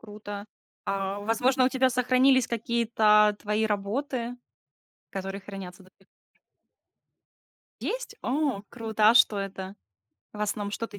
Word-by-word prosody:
Круто. 205 Hz, -1 st, -8 dB, 0.4 s
А, 195 Hz, +1 st, -2 dB
возможно, 245 Hz, +5 st, +2 dB
у -, -, +4 dB
тебя 260 Hz, -1 st, +2 dB
сохранились 255 Hz, +1 st, +4 dB
какие-то 220 Hz, -2 st, +3 dB
твои 210 Hz, +1 st, 0 dB
работы, 235 Hz, +4 st, -2 dB, 0.7 s
которые 195 Hz, +1 st, -5 dB
хранятся 190 Hz, -1 st, -9 dB
до 185 Hz, -, -20 dB
сих 195 Hz, -, -26 dB
пор? -, -, -45 dB, 1.4 s
Есть? -, -, -4 dB
О, 270 Hz, -6 st, 0 dB
круто, 220 Hz, -2 st, +2 dB
а -, -, +3 dB
что 220 Hz, -3 st, +5 dB
это? 195 Hz, 0 st, -5 dB, 0.6 s
В 210 Hz, -, -9 dB
основном, 205 Hz, -1 st, -2 dB
что 230 Hz, +2 st, -3 dB
ты 205 Hz, -2 st, -11 dB
215 Hz, 130 wpm, -27 LUFS, 200-245 Hz, 1.4 s, что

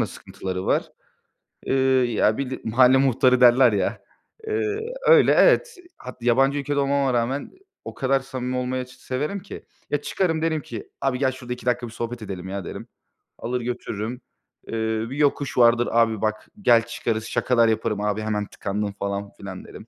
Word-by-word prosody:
da -, -, +1 dB
sıkıntıları 95 Hz, -1 st, -6 dB
var. -, -, 0 dB, 0.7 s
Eee, -, -, -1 dB, 0.4 s
ya 110 Hz, 0 st, +2 dB
bir 140 Hz, -2 st, -3 dB
de 130 Hz, -, -5 dB
mahalle 125 Hz, +3 st, +5 dB
muhtarı 130 Hz, -1 st, +3 dB
derler 125 Hz, 0 st, +7 dB
ya. 95 Hz, -2 st, -1 dB, 0.5 s
Eee, 430 Hz, -1 st, -1 dB, 0.3 s
öyle, 485 Hz, -, +7 dB
evet. -, -, +4 dB, 0.2 s
Hat 125 Hz, -1 st, -10 dB
yabancı 135 Hz, +4 st, +3 dB
ülkede 145 Hz, 0 st, -1 dB
olmama 140 Hz, -1 st, +1 dB
rağmen 120 Hz, +4 st, -1 dB, 0.3 s
o -, -, -6 dB
kadar 135 Hz, +1 st, +1 dB
samimi 130 Hz, -1 st, -5 dB
olmayı 125 Hz, 0 st, -2 dB
severim 135 Hz, +9 st, -4 dB
ki. 195 Hz, -, -10 dB, 0.2 s
Ya, 145 Hz, -, -1 dB
çıkarım, 165 Hz, 0 st, -1 dB
derim 160 Hz, -1 st, 0 dB
ki: 115 Hz, -5 st, -8 dB
"Abi 135 Hz, -2 st, 0 dB
gel 130 Hz, -1 st, +2 dB
şurada 125 Hz, -1 st, -6 dB
2 125 Hz, -, -11 dB
dakika 120 Hz, -1 st, 0 dB
bir -, -, -10 dB
sohbet 115 Hz, +1 st, -5 dB
edelim 95 Hz, -3 st, -6 dB
ya." 95 Hz, -2 st, -5 dB
derim. -, -, -7 dB, 0.5 s
Alır 125 Hz, +1 st, -3 dB
götürürüm. 120 Hz, -1 st, -4 dB, 0.5 s
Eee, -, -, -7 dB, 0.4 s
bir 135 Hz, -, -6 dB
yokuş 145 Hz, -2 st, 0 dB
vardır, 120 Hz, 0 st, +4 dB
"Abi 115 Hz, -2 st, +2 dB
bak 110 Hz, 0 st, -2 dB
gel 115 Hz, -, +5 dB
çıkarız." 115 Hz, -1 st, -3 dB
Şakalar 120 Hz, 0 st, +2 dB
yaparım: 110 Hz, -1 st, 0 dB
"Abi 105 Hz, 0 st, -1 dB
hemen 105 Hz, -1 st, -2 dB
tıkandın." 100 Hz, +1 st, -4 dB
falan 100 Hz, 0 st, -4 dB
filan 95 Hz, -2 st, -8 dB
derim. 110 Hz, -, -12 dB
125 Hz, 170 wpm, -23 LUFS, 110-135 Hz, 0.7 s, derler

